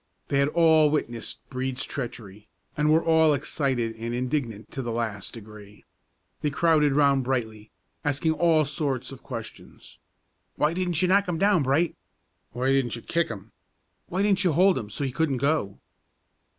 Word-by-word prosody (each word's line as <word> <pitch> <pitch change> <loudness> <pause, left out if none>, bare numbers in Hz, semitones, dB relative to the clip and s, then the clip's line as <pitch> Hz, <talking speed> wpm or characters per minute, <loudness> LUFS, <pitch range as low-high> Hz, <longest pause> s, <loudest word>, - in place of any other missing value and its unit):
They 140 - +1
had 140 - +3
all 160 -1 +4
witnessed 120 -6 -3
Brede's 130 0 -3
treachery, 110 -5 -7 0.3
and 150 0 +1
were 160 +1 +4
all 160 -2 +4
excited 130 -5 -2
and 115 +1 -4
indignant 125 -4 -3
to 135 - -4
the 120 -2 -4
last 110 -4 -4
degree. 105 -2 -13 0.6
They 150 - +1
crowded 150 -1 +3
around 140 -1 +3
Brightly, 110 -4 -3 0.3
asking 145 +2 +1
all 160 -1 +3
sorts 140 -3 -2
of 135 - -11
questions: 115 -4 -10 0.6
"Why 150 +2 +1
didn't 180 -1 0
you - - +3
knock 200 +1 +3
'im 170 - -1
down, 195 -1 +3
Bright?" 140 +5 +1 0.6
"Why 130 +3 0
didn't 135 -4 +1
you 115 - -9
kick 170 -1 0
'im?" 105 0 -8 0.6
"Why 185 +3 -1
didn't 200 -1 +2
you 175 -4 +2
hold 185 0 +4
'im 105 -4 -7
so't 140 +7 -3
he 130 - -2
couldn't 145 -1 0
go?" 140 -7 0
140 Hz, 165 wpm, -26 LUFS, 120-160 Hz, 0.6 s, all